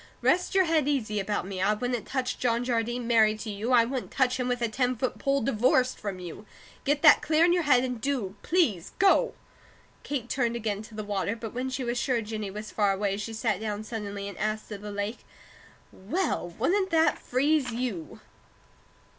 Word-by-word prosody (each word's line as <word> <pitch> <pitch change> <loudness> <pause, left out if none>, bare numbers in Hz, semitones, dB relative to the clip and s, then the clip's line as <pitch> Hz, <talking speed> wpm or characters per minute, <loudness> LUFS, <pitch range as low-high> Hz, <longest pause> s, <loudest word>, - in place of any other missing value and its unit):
Rest 360 +2 +2
your 380 - +6
head 320 -4 +2
easy 220 -8 0
about 205 -1 -2
me. 190 -1 -5
I 210 +2 +3
wouldn't 245 +1 -3
touch 255 -2 -2
John 235 -1 +1
Jardine 240 0 -1
married 220 -2 +4
to 215 - -4
you; 210 +5 -3
I 235 -2 +6
wouldn't 255 +1 -4
touch 260 -1 +1
him 250 - 0
with 245 -1 -1
a - - +3
ten 250 +3 0
foot 250 +2 -2
pole, 275 0 +1
divorced 250 +2 +2
from 200 -3 -4
you. 180 +4 -9 0.4
Get 290 +2 +1
that 305 - +8
clear 315 +2 +3
in 350 - +4
your 355 - +2
head, 255 -3 +6
and 250 -3 -3
do 255 -8 -1
please 300 - +1
go!" 395 +6 +4 0.7
Kate 270 -5 -3
turned 240 -2 0
again 215 -3 -2
to 220 0 -12
the 215 - -4
water, 205 0 -1
but 225 -2 -7
when 255 +2 -2
she 260 0 -3
was 240 0 -1
sure 250 -1 +1
Jennie 215 -1 -4
was 210 +2 -7
far 205 -2 +2
away 195 0 -1
she 215 +2 -5
sat 220 -3 0
down 210 -1 -3
suddenly 205 -3 -5
and 200 - -8
asked 215 +1 -2
of 205 -1 -6
the 210 0 -6
lake: 205 +3 -3 0.7
"Well, 215 - -2
wouldn't 380 - +1
that 325 -2 +3
freeze 275 0 +1
you?" 230 -9 -4
235 Hz, 205 wpm, -28 LUFS, 210-260 Hz, 0.7 s, that